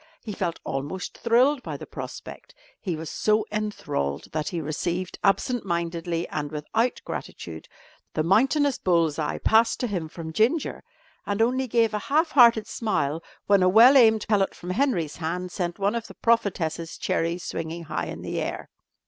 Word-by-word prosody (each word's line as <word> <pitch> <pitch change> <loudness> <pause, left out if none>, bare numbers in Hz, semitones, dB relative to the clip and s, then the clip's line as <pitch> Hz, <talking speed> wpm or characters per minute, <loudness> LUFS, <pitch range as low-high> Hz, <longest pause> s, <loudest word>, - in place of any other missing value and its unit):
He 215 - -5
felt 175 -3 -2
almost 145 +7 -4
thrilled 250 +4 +3
by - - -5
the - - -9
prospect. - - -9 0.2
He 180 -5 -3
was 160 +1 -6
so 215 +6 +1
enthralled 205 - -3
that 155 -1 -2
he 175 - -2
received 170 +4 -3
absent 240 +5 +2
mindedly, 170 -1 -2
and 145 -1 -3
without 220 +11 -1
gratitude, 80 -1 -7 0.5
the 155 - +1
mountainous 265 - +3
bull's 165 -4 +2
eye 150 - -1
passed 225 +1 +3
to - - +1
him 185 -8 -3
from 160 -1 -7
Ginger, 250 - +1 0.4
and 205 0 -1
only 255 +3 +2
gave 230 -2 +2
a 210 - 0
half 310 +3 +2
hearted 235 -5 +6
smile 165 - -1 0.2
when 200 -1 +4
a 185 - +5
well 235 +8 +8
aimed 220 -4 +5
pellet 205 -3 +2
from 180 - -6
Henry's 185 - 0
hand 175 +3 -3
sent 175 -2 -3
one 200 +2 +1
of 235 -1 -3
the - - -12
prophetess's 175 -8 0
cherries 170 +2 -1
swinging 165 +1 -5
high 155 - -3
in - - -7
the - - -3
air. - - -4
190 Hz, 170 wpm, -25 LUFS, 165-230 Hz, 0.5 s, well